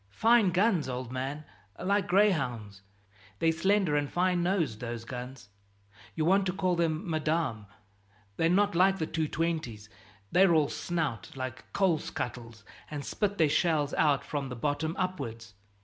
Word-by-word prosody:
Fine 225 -3 +5
guns, 180 - +2
old 125 -1 -5
man, 135 +4 -4 0.3
like 200 +1 0
gray 200 +3 +5
hounds. 115 - -4 0.6
They're 165 +6 +2
slender 190 -1 +2
and 145 -1 0
fine 180 0 +1
nosed, 170 - 0
those 115 -2 -5
guns 125 -2 -8 0.7
you 155 - 0
want 190 +2 +3
to 185 - -1
call 185 -1 0
them 170 +2 -1
'Madame.' 155 -9 -1 0.7
They're 165 +7 +2
not 200 +2 +3
like 190 +3 +4
the 160 - -1
220's 155 -9 -2 0.4
they're 180 -1 +5
all 150 -2 +3
snout, 160 -10 -3
like 130 -1 -6
coal 185 -5 +2
scuttles, 115 -5 -6 0.3
and 145 -2 -5
spit 205 -1 -1
their 160 - +4
shells 150 -2 +1
out 145 -3 +2
from 140 -2 -3
the 125 - -5
bottom 145 +5 -2
upwards. 115 - -4
155 Hz, 150 wpm, -29 LUFS, 130-180 Hz, 0.7 s, Fine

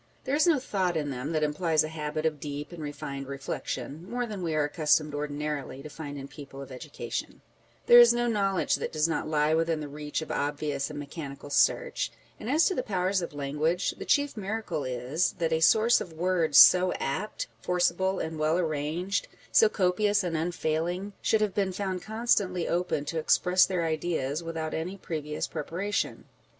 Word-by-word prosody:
There 265 - -3
is 310 +4 +3
no 325 -3 +5
thought 190 -9 -1
in 145 -2 -2
them 130 +4 -4
that 155 -2 0
implies 155 +1 +2
a - - -2
habit 155 0 -4
of 155 -2 0
deep 145 +1 -6
and 170 -2 -8
refined 140 -2 -6
reflection 140 +4 -5
(more 245 +1 -1
than 210 -4 -6
we 165 -3 -1
are 155 - +2
accustomed 150 0 +2
ordinarily 145 -2 -4
to 150 - -8
find 145 -1 -7
in 135 0 -7
people 140 -1 -11
of 135 -1 -9
education); 125 - -6 0.4
there 240 - +9
is 240 -1 +9
no 240 0 +1
knowledge 195 -5 +1
that - - -4
does 155 0 +1
not 165 - -2
lie 155 0 +2
within 165 0 +1
the 150 - -5
reach 150 +2 -4
of - - -7
obvious 145 -1 -2
and 150 - -7
mechanical 145 -1 -7
search; - - +2 0.3
and 220 - -6
as 305 +5 +4
to 380 - +2
the 255 - -1
powers 190 -3 0
of 170 - -4
language, 150 +5 0
the - - -8
chief 285 -1 +2
miracle 200 -7 -3
is, 130 +7 -1
that 165 -3 -1
a 160 - +2
source 220 +8 +5
of 170 - -7
words 165 -3 +1
so 180 0 +8
apt, 185 +11 -3 0.2
forcible, 190 +1 +1
and 160 -1 -4
well 155 +2 +2
arranged, 165 +4 -1 0.2
so 450 - +6
copious 205 - +2
and 175 -2 -2
unfailing, 175 +3 -2
should 220 - +2
have 210 -3 +1
been 195 -2 0
found 185 -1 -3
constantly 210 -5 0
open 175 -4 -1
to 165 - -2
express 180 +3 +4
their 180 -3 -1
ideas 155 -2 -1
without 165 -1 -4
any 180 +5 -3
previous 150 -4 -4
prepara 185 +7 -4
tion. - - -1
165 Hz, 190 wpm, -28 LUFS, 150-190 Hz, 0.4 s, there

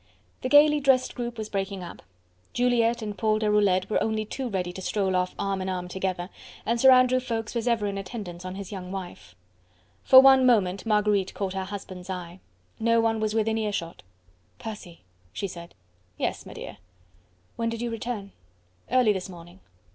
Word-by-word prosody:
The 255 - -2
gaily 295 +1 +6
dressed 270 -2 +3
group 240 -1 -5
was 215 -1 -4
breaking 195 -2 -3
up. 170 - -9 0.5
Juliette 240 -1 +2
and 210 -1 -4
Paul 215 0 +1
Deroulede 210 -3 +2
were 215 - 0
only 220 -1 -1
too 255 +3 -4
ready 180 -3 -2
to 190 - -7
stroll 190 -1 0
off 180 0 0
arm 195 -1 -2
in 190 - -3
arm 180 -1 -3
together, 185 0 -3 0.3
and 235 +1 0
Sir 265 - +8
Andrew 255 0 +5
Ffoulkes 230 -4 -4
was 235 0 -2
ever 230 -3 +1
in 200 -1 -2
attendance 185 -3 -7
on 185 0 -6
his 200 0 -7
young 185 -2 -7
wife. 175 - -8 0.7
For 260 - +9
one 265 0 +7
moment 200 -5 +2
Marguerite 210 -3 +1
caught 195 -2 -3
her 190 -1 -3
husband's 190 -2 -8
eye. 180 -1 -6 0.4
No 230 +1 +3
one 225 -1 +1
was 215 0 -1
within 220 0 +1
earshot. 200 -6 -3 0.6
"Percy," 210 -7 -9 0.3
she 200 - -3
said. 170 -2 -10 0.4
"Yes, - - -2
m'dear." - - -9 0.8
"When 230 0 -1
did 230 0 -4
you 240 - -2
return?" 225 -3 -5 0.6
"Early 250 -4 +4
this 190 0 -5
morning." 175 +1 -12
210 Hz, 175 wpm, -26 LUFS, 185-230 Hz, 0.8 s, For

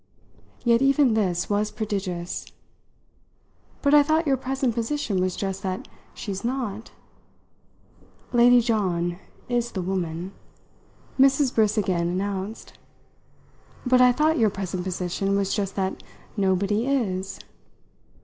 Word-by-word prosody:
Yet 235 0 +4
even 275 -2 +4
this 185 -5 0
was 210 +1 0
prodigious. 190 -5 -4 1.4
"But 285 0 +3
I 295 - +9
thought 315 +3 +1
your 275 -2 +3
present 265 -1 -1
position 230 -4 -1
was 185 -1 0
just 195 -1 -3
that 185 -2 -4 0.3
she's 195 0 -5
not!" 235 -4 -3 1.4
"Lady 245 0 +6
John 180 -7 0 0.3
is 240 -1 -1
the 190 - -2
woman," 180 -1 -3 0.9
Mrs. 270 0 +4
Briss 215 -1 +2
again 180 -4 +1
announced. 195 +3 -4 1.1
"But 250 0 +4
I 250 0 +7
thought 310 +4 +2
your 220 -2 +4
present 185 -2 -4
position 185 +2 -1
was 195 -1 0
just 200 -2 -2
that 190 -1 -2 0.3
nobody 200 +3 +1
is!" 195 -9 -1
205 Hz, 120 wpm, -25 LUFS, 190-245 Hz, 1.4 s, I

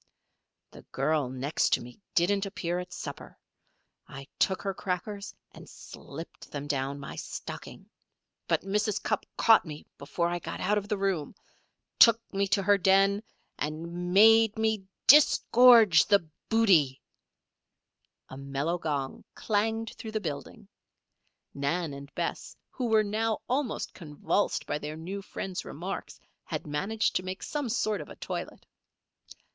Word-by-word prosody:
"The - - -13
girl 145 -1 0
next 130 +4 0
to - - +2
me 125 0 -13 0.2
didn't 195 +3 +2
appear 175 -3 -3
at 180 0 -7
supper. - - -8 0.7
I 135 0 -10
took 190 - +1
her 195 - -1
crackers 200 +2 -4 0.2
and - - -13
slipped 160 +4 -11
them 145 -1 -5
down 140 -1 -2
my 140 - -8
stocking. - - -8 0.6
But - - +1
Mrs. 205 +1 -1
Cupp 215 - -1
caught 225 -1 +6
me 150 -3 -9
before 160 +4 -1
I 175 0 -2
got - - -6
out 210 0 +1
of 205 - -10
the 210 -1 -1
room, 195 -6 -1 0.6
took 230 -1 +8
me 200 0 +1
to 195 +1 +1
her 200 +1 +4
den, 195 +2 +4 0.4
and 170 +4 -4
made 225 +2 +6
me 220 -3 0 0.2
disgorge 245 - +7
the 200 -5 +3 0.2
booty 180 - +4 0.6
" - - -52
A 130 - -8
mellow 140 +5 -2
gong 145 -5 -3
clanged 220 +1 -1
through 220 -1 -7
the 215 - 0
building. 150 -8 -6 0.9
Nan 145 +3 -2
and 140 +1 -10
Bess, - - -4 0.2
who 250 - -3
were 220 -1 +4
now 215 +1 -1
almost 255 -1 -2
convulsed 165 +4 -1
by 150 - -2
their 150 +1 -6
new 190 +5 -6
friend's 190 -1 -5
remarks, - - -6 0.2
had - - -5
managed 195 +10 -1
to - - -3
make 185 +1 -6
some 290 -5 -3
sort 215 -4 0
of 150 - -10
a - - -10
toilet. - - -6
190 Hz, 145 wpm, -28 LUFS, 150-215 Hz, 0.9 s, took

